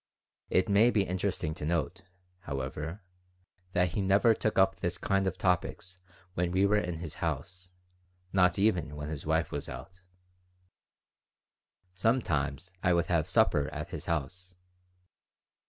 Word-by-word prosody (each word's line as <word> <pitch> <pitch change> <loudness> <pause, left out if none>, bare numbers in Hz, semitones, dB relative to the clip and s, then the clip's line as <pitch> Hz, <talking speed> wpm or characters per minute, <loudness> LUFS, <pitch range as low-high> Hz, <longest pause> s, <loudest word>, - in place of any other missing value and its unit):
It 95 - +2
may 105 +3 +5
be 105 -4 +2
interesting 90 -4 -2
to 75 - -8
note, 85 +3 -1 0.4
however, 75 +4 -5 0.7
that 90 0 +3
he 95 +5 -2
never 100 +4 +4
took 110 0 -1
up 95 0 +4
this 85 0 -2
kind 95 -1 +1
of 95 0 -2
topics 90 0 -1 0.3
when 90 -1 0
we 95 +3 +3
were 105 +1 +3
in 90 -3 -3
his 80 -2 -6
house, 85 +4 -3 0.6
not 90 -2 +4
even 90 -8 +1
when 75 0 -5
his 75 -1 -6
wife 80 0 +1
was 70 - -4
out 90 +9 -9 1.9
Sometimes 90 - 0
I 90 - +3
would 85 0 +2
have 80 -2 +1
supper 70 -1 +3
at - - -6
his - - -5
house. 90 +4 -3
90 Hz, 140 wpm, -30 LUFS, 80-95 Hz, 1.9 s, may